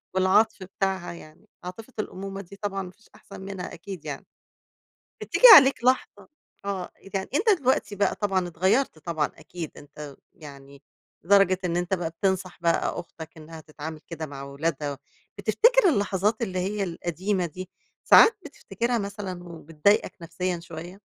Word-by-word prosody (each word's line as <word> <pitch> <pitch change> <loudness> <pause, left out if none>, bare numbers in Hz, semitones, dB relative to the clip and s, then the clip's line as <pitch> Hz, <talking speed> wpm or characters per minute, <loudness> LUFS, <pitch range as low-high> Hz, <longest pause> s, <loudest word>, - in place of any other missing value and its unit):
والعطف 190 +2 +3
بتاعها 190 -2 -3
يعني 155 -2 -15 0.2
عاطفة 215 +8 -9
الأمومة 195 -1 -5
دي 200 +1 -13
طبعًا 195 -1 -4
ما 180 - -9
فيش 225 - -26
أحسَن 195 -1 -12
منها 190 -2 -7
أكيد 175 -1 -9
يعني. - - -6 1.0
بتييجي - - +5
عليك 270 -4 +6
لحظة 255 +1 0 0.4
آه، 195 -3 -4 0.2
يعني 190 -1 -2
أنت 420 +8 +2
دلوقتي 250 -6 0
بقى 200 -1 +1
طبعًا 190 -3 0
اتغيّرت 185 +3 +1
طبعًا 155 -1 -1
أكيد 170 -3 -8
أنت 145 -1 -10 0.2
يعني 140 -2 -13 0.4
لدرجة 195 0 +4
إن 175 0 0
أنت 175 +2 -2
بقي 170 -3 -1
بتنصح 185 +1 -2
بقى 170 +1 0
أختك 160 -2 -10
إنها 160 +1 -11
تتعامل 155 0 -8
كده 160 -2 -5
مع 140 -2 -9
أولادها، 140 0 -3 0.4
بتفتكر 475 -3 +4
اللحظات 205 - 0
اللي 185 -5 -2
هي 200 +2 -2
القديمة 180 +2 -2
دي، 185 +3 -8 0.3
ساعات 450 - +7
بتفتكرها 235 -4 -3
مثلًا 200 -3 -5
وبتضايقك 165 +3 0
نفسيًا 180 +1 -3
شويّة؟ 170 +2 -9
185 Hz, 145 wpm, -25 LUFS, 165-200 Hz, 1.0 s, ساعات